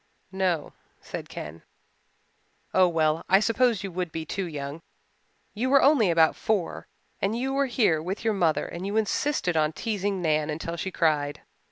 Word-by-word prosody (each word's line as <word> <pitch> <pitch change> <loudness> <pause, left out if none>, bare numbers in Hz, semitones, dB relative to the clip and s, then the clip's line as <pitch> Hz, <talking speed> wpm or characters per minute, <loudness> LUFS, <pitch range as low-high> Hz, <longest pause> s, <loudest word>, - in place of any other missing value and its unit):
"No," 185 -5 -1 0.3
said - - -7
Ken. 75 +2 -8 1.1
"Oh 185 -1 +5
well, 160 -2 +1
I 190 - +6
suppose 230 -1 +2
you 195 - -4
would 180 -1 -3
be 160 0 -5
too 190 +4 -3
young 145 0 -6 0.7
you 240 +5 -1
were 275 0 +5
only 270 -8 +5
about 165 -1 +4
four 210 -6 -2 0.3
and 205 +4 0
you 265 +2 -1
were 275 0 +1
here 210 -11 +2
with 190 +7 -5
your 220 - +3
mother 170 -6 +1
and 170 - -7
you 205 +2 -1
insisted 220 - 0
on 155 0 +2
teasing 205 -2 -2
Nan 155 -3 +1
until 160 +2 -4
she 170 +3 -3
cried. 150 -5 0
185 Hz, 170 wpm, -26 LUFS, 160-215 Hz, 1.1 s, I